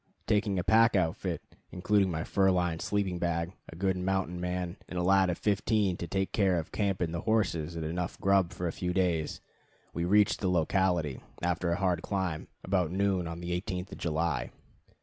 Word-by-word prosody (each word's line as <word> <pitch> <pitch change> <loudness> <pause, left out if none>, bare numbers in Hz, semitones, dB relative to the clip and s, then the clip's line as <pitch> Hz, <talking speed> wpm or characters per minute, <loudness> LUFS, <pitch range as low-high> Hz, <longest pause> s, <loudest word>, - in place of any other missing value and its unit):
Taking 105 -2 +1
a 90 - 0
pack 115 +4 +5
outfit, 80 -4 0 0.3
including 95 +1 +2
my 80 -2 -2
fur 95 +1 +2
lined 90 -3 +1
sleeping 100 -4 -1
bag, 85 +1 -1 0.2
a - - -9
good 95 +2 0
mountain 90 -1 -1
man, 90 -1 -3
and 90 - -5
a 90 - 0
lad 95 0 +4
of 90 - -1
fifteen 105 -2 +1
to 85 - -5
take 95 +3 -1
care 95 -4 +3
of 80 - -4
camp 100 -3 -1
and 85 -2 -1
the 85 - -2
horses, 85 -7 0
and 80 -1 -3
enough 85 +2 -3
grub 95 -3 +3
for 90 - -3
a - - -1
few 90 -1 -2
days, 85 -4 0 0.5
we 85 - -2
reached 105 +3 +4
the 95 - 0
locality, 90 -4 +1 0.2
after 85 0 0
a - - +2
hard 90 -4 +1
climb, 95 -6 -2 0.2
about 90 -4 +1
noon 95 -1 0
on 85 +1 -6
the 85 0 -4
18th 95 -2 -5
of - - -8
July. 80 -6 -1
90 Hz, 195 wpm, -30 LUFS, 85-95 Hz, 0.5 s, pack